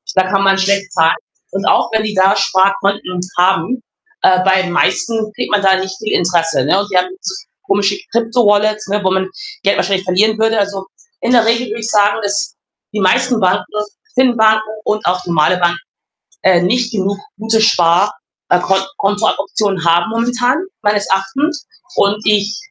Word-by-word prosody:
Da 190 - +4
kann 195 +1 +1
man 195 0 +3
schlecht 200 0 0
zahlen 165 -1 +3 0.4
und 195 +2 -3
auch - - +3
wenn 220 -1 0
die 210 -1 -3
da 190 +1 +3
Sparkonten 195 -1 0 0.2
haben, 190 +7 +1 0.4
äh, 185 0 +4
bei 190 0 +4
den 185 -2 -4
meisten 220 +4 0
kriegt - - -4
man 210 -1 +2
da 190 -1 +4
nicht 190 0 -4
viel 215 - -4
Interesse, 170 -5 +1
ne? 185 +6 +2
Und 205 +1 -3
die 185 - +1
haben 180 0 +1
so 190 -1 -4 0.3
komische 200 0 0
Krypto-Wallets, 215 -2 +1
ne, 205 +1 -1
wo 190 - +1
man 190 0 0 0.4
Geld - - +2
wahrscheinlich 190 -1 0
verlieren 210 +4 +2
würde. 225 0 +2
Also, 200 -1 -2 0.4
in 235 - 0
der 235 -3 +4
Regel 235 +1 +1
würde 220 +2 -5
ich 220 - -3
sagen, 205 -2 +3
dass 200 0 -2 0.4
die 210 - -2
meisten 235 +6 +2
Banken, 185 0 +2 0.5
Fin-Banken 220 -4 +3 0.2
und 210 0 -1
auch 180 +1 -1
normale 170 +1 +2
Banken, 175 -1 +1 0.7
äh, 185 -2 +4
nicht 235 +6 0
genug 200 -1 -2 0.2
gute 220 0 +1
Spar 180 -2 +3 0.4
äh, 180 - +4
Kon 190 +1 +1 0.2
Kontooptionen 205 - -1
haben 170 +3 +2
momentan 245 +4 0 0.2
meines 205 0 +1
Erachtens 280 +11 -1 0.3
und 205 +1 +1
ich 210 0 +1
200 Hz, 175 wpm, -15 LUFS, 190-220 Hz, 0.7 s, Da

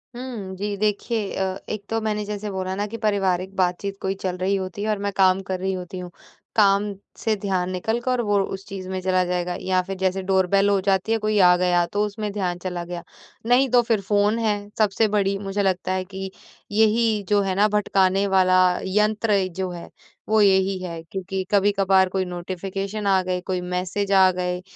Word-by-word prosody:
हुँ, 230 -7 -6
जी। 205 +2 -3
देखिए 210 +1 -1
अ, 190 0 -1
एक 215 -1 -4
तो 225 - 0
मैंने 210 -1 -1
जैसे 210 0 -4
बोला 190 0 -3
ना 205 +1 -1
कि 230 - -6
पारिवारिक 195 -3 0
बातचीत 185 +2 -1
कोई 190 - -1
चल 180 -1 -2
रही 190 +2 0
होती 190 +1 -4
है 215 - -1
और 210 - +1
मैं - - -1
काम 190 0 +4
कर 185 - -1
रही 190 +1 -1
होती 185 0 -6
हूँ। 180 -1 -7 0.4
काम 200 -2 +4 0.3
से 220 -1 0
ध्यान 190 -3 -1
निकल 220 +6 -1
कर 250 0 0
और 205 -1 +3
उस 195 0 -5
चीज़ 190 -1 -7
में 190 0 -2
चला 185 0 +2
जाएगा 180 0 -2
या 185 -1 +1
फिर 195 - -4
जैसे 190 0 0
डोरबेल 195 +1 +2
हो 200 -1 +3
जाती 195 +2 +1
है 225 - +3
कोई 215 -1 +2
आ 180 - +6
गया 175 -1 +2
तो 205 +1 +1
उसमें 210 0 -4
ध्यान 185 -4 -2
चला 180 -1 -4
गया। 175 0 -6 0.4
नहीं 250 +3 +4
तो 245 0 +5
फिर 230 -3 0
फ़ोन 205 +3 +1
है, 205 -2 -1
सबसे 215 0 +2
बड़ी 195 -1 +1
मुझे 195 0 -2
लगता 185 -1 0
है 185 0 0
कि 190 0 -7 0.4
यही 220 0 +2
जो 205 -1 +4
है 195 -1 -1
ना 205 +2 +4
भटकाने 195 -2 +2
वाला 185 -1 +4 0.3
यंत्र 210 +2 +2 0.2
जो 185 - -1
है, 175 -1 -8 0.4
वो 220 0 +4
यही 190 -1 +3
है 170 -2 -5
क्योंकि 190 +2 -4
कभी-कभार 195 -2 +3
कोई 190 0 -1
नोटिफ़िकेशन 190 +3 -4
आ 190 -1 +4
गए, 180 0 -1
कोई 185 0 -3
मैसेज 180 +3 -2
आ 190 -1 +6
गए 180 0 -2
195 Hz, 205 wpm, -23 LUFS, 185-210 Hz, 0.4 s, आ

